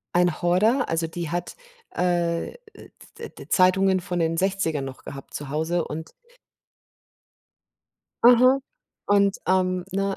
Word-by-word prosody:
Ein 175 -2 +2
Horder, 215 +9 +2
also, 165 0 0
die 165 0 -5
hat, 175 +1 -4 0.4
äh, 175 -2 -1 0.7
d - - -7
d - - -13
Zeitungen 190 +1 +3
von 180 0 -5
den 165 -1 0
60ern 185 -6 -1
noch 135 -1 -9
gehabt 135 -1 -10
zu 145 -2 -6
Hause 160 +3 -1
und 160 +2 -7 2.1
Mhm. 250 +3 +6 0.5
Und, 200 -1 +3
ähm, 185 -1 +1
ne, 195 +1 -1
180 Hz, 125 wpm, -24 LUFS, 165-195 Hz, 2.1 s, Mhm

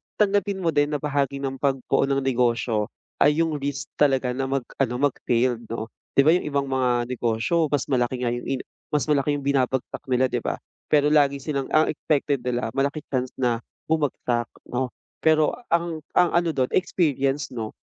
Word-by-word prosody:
tanggapin 200 -2 +1
mo 165 - +2
din 145 0 +1
na - - -1
bahagi 140 -1 -1
ng 135 -1 -3
pagbuo 135 -1 +1
ng 135 -1 0
negosyo 120 -4 +1 0.3
ay 150 +3 +4
'yung 155 -3 -2
risk 140 +1 -4
talaga 135 -3 +3
na 135 +1 -2
mag-ano, 135 -1 -1
mag-failed 125 -3 0
'no. 115 0 -5 0.2
'Di 140 - +6
ba, 155 - +6
'yung 175 -2 +1
ibang 140 -1 0
mga 125 -2 +2
negosyo 120 +6 0
mas 145 -2 0
malaki 125 0 0
nga 120 - +1
'yung 120 0 -4
in 135 -1 -1 0.4
mas 145 - +2
malaki 145 0 +2
'yung 140 - -5
binabagsak 130 -2 0
nila, 130 0 +2
'di - - 0
ba? - - -2 0.3
Pero 150 0 +3
lagi 140 -2 +3
silang 140 -3 -2
ang 155 0 +4
expected 145 -2 0
nila 125 0 -1
malaki 140 +3 -1
chance 130 -1 -2
na 120 -3 +1 0.3
bumagsak 125 -6 0 0.2
'no, 125 +1 0 0.4
pero 155 -1 +4 0.2
ang 170 -2 0
ang 175 - +4
ano 170 -1 +3
do'n 130 -4 0
experience, 140 -6 +1
'no. 110 -2 -4
135 Hz, 180 wpm, -24 LUFS, 125-150 Hz, 0.4 s, Di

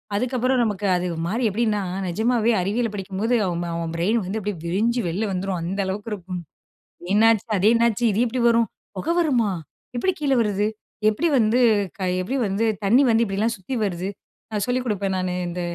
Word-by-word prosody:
அதுக்கப்புறம் 255 +2 +1
நமக்கு 205 -2 -2
அது 180 0 -1 0.2
மாறி 230 +6 -1
எப்படின்னா, 210 0 0 0.3
நிஜமாவே 230 +5 +1
அறிவியல் 215 +3 -1
படிக்கும்போது 200 +5 -1
அவன் 175 -1 -2
அவன் 165 -1 -3
பிரெயின் 205 +8 +1
வந்து 210 +4 -3
அப்படியே 205 -3 -4
விரிஞ்சி 230 +7 +1
வெளிய 205 +6 -1
வந்துரும், 185 -1 -2
அந்த 190 +4 -3
அளவுக்கு 205 +4 -4
இருக்கும். 180 -2 -5 0.7
என்னாச்சு? 225 +1 +4
அதே 200 +4 +4
என்னாச்சு? 235 0 +2
இது 215 - 0
எப்படி 245 +1 -1
வரும்? 230 -1 +3 0.3
புகை 330 - -1
வருமா? 245 -10 +2 0.5
எப்படி 375 +10 +1
கீழே 275 -3 +2
வருது? 205 -1 0 0.4
எப்படி 330 +11 0
வந்து 225 +2 +3 0.6
எப்படி 260 +9 -2
வந்து 200 +4 0 0.2
தண்ணி 240 +8 +5
வந்து 225 +1 +4
இப்படிலாம் 210 +4 -1
சுத்தி 190 +8 -5
வருது? 185 -1 -2 0.4
நான் 210 -2 -1
சொல்லிக் 250 +1 0
கொடுப்பேன் 200 -3 -1
நானு, 185 -1 -1 0.2
இந்த 175 +1 -4
210 Hz, 170 wpm, -23 LUFS, 190-235 Hz, 0.7 s, தண்ணி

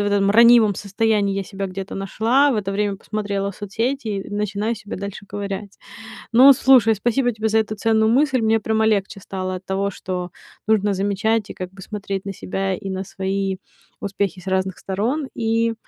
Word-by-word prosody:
этом 200 -1 +2
ранимом 230 -1 +6
состоянии 205 0 0
я 195 - -2
себя 195 +1 -5
где-то 190 +1 -6
нашла, 230 +8 +2
в - - -1
это 195 -2 -2
время 200 0 -1
посмотрела 200 -1 -3
соцсети 225 +6 -3
и 200 -2 -4
начинаю 210 +2 -1
себя 210 -1 -7
дальше 200 +1 -7
ковырять. 200 0 -6 0.5
Ну, 260 +4 +9
слушай, 250 -4 +5
спасибо 240 +4 +1
тебе 220 0 -1
за 220 +1 +2
эту 215 -1 -1
ценную 220 0 +2
мысль. 265 +1 +3
Мне 225 0 +2
прямо 220 +1 +1
легче 200 -2 0
стало 185 -1 -4
от 185 +1 -11
того, 195 +1 -1
что 180 -2 -5 0.4
нужно 210 -2 +2
замечать 205 +2 0
и - - -6
как 185 -1 -6
бы 190 0 -12
смотреть 195 -1 -5
на 195 - -3
себя, 195 0 -2
и 195 +2 -6
на 190 0 -3
свои 195 0 -2 0.4
успехи 200 -2 -2
с 180 - -17
разных 190 0 -1
сторон. 240 +10 -2
И 230 0 0
205 Hz, 180 wpm, -21 LUFS, 195-220 Hz, 0.5 s, Ну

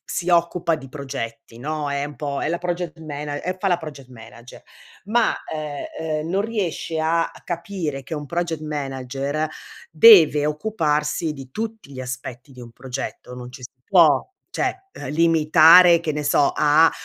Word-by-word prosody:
si 175 - -4
occupa 170 -1 +2
di 135 -3 -11
progetti, 115 -5 -7
no, 150 +2 -3
è 140 0 -1
un 145 0 -8
po' 140 -2 -3
è - - -1
la 170 - -1
project 175 -2 -4
mana 145 -1 -5
e 185 +1 -3
fa 195 - -2
la 175 - +2
project 145 -5 -10
manager. 120 0 -13 0.4
Ma, 230 +2 +2 0.2
ehm 150 -2 -5 0.3
ehm, 155 - -5
non 195 +3 0
riesce 190 -7 -3
a 165 +1 +1
capire 170 -5 -4
che 165 - -12
un 150 -1 -6
project 170 0 -2
manager 140 0 -3 0.4
deve 160 -5 +7
occuparsi 150 -2 -1
di 135 -3 -11
tutti 220 -4 -6
gli 130 - -6
aspetti 130 +1 -7
di 125 - -13
un 120 -1 -11
progetto, 125 0 -7
non 125 0 -9
ci 125 - -12
si 125 - -9
può 170 -7 +4 0.3
cioè, 385 0 -2
eh, - - -8
limitare, 165 +2 +6
che 160 -2 -2
ne 150 - -3
so, 145 0 +3
a, 155 +2 +5
155 Hz, 170 wpm, -22 LUFS, 140-170 Hz, 0.4 s, deve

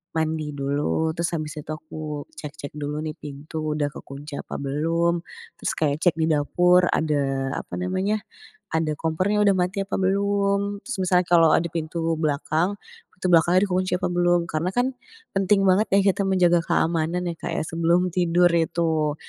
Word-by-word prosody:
mandi 155 -2 -1
dulu, 145 +3 0
terus 170 +1 -2
habis 155 -1 -4
itu 150 - -11
aku 155 -1 -6 0.2
cek-cek 145 -1 -7
dulu 150 0 -4
nih 155 - -3
pintu 145 +2 -7 0.2
udah 145 -1 -1
kekunci 140 +1 -8
apa - - -7
belum. 165 +5 0 0.4
Terus - - -1
kayak 150 -1 0
cek 175 -1 +3
di 165 - 0
dapur 180 +4 +3
ada, 135 -3 0
apa - - -8
namanya, 185 +3 -1 0.5
ada 155 -2 0
kompor 165 +4 0
yang 210 0 +3
udah 200 - +5
mati 190 +2 -1
apa - - -4
belum? 200 +1 0
Terus 255 - -5
misalnya 180 -1 +2
kalau 165 -2 +6
ada 170 0 +1
pintu 165 0 -3 0.2
belakang, 155 +4 0 0.4
pintu 185 0 -4
belakangnya 175 +2 +5
dikunci 185 +1 0
apa 180 0 0
belum? 175 -1 +2
Karena 160 +4 -1
kan 245 +1 +2 0.4
penting 195 +1 +2
banget 195 +3 +4
ya - - +6
kita 195 +1 -1
menjaga 180 -2 +4
keamanan 165 +1 0
ya - - -4
Kak - - -4
ya, - - -1
sebelum 170 +3 +1
tidur 175 0 +3
itu. 160 -2 +1
170 Hz, 170 wpm, -24 LUFS, 155-185 Hz, 0.5 s, kalau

